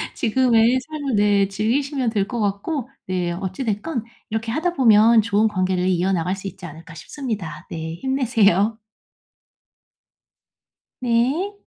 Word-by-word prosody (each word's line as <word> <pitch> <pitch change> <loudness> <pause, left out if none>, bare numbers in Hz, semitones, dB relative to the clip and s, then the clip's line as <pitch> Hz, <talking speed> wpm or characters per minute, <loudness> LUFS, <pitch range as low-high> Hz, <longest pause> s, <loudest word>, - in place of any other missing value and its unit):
지금의 240 +1 +3
삶을 285 -2 -4
네 205 -1 +3
즐기시면 250 +6 -1
될 205 -3 0
것 240 0 -4
같고 215 +7 -2 0.2
네 180 -2 -1
어찌 190 +6 -4
됐건 225 +4 -2 0.3
'이렇게 225 +1 -3
하다 330 +7 -1
보면 230 -4 +6
좋은 215 0 +2
관계를 185 -3 0
이어나갈 180 0 +1
수 195 0 -7
있지 190 -1 -9
않을까?' 165 +1 -11
싶습니다. 210 - -6
네 160 0 -5
힘내세요. 225 -4 +2 2.3
네. 270 - 0
220 Hz, 260 characters per minute, -22 LUFS, 190-255 Hz, 2.3 s, 보면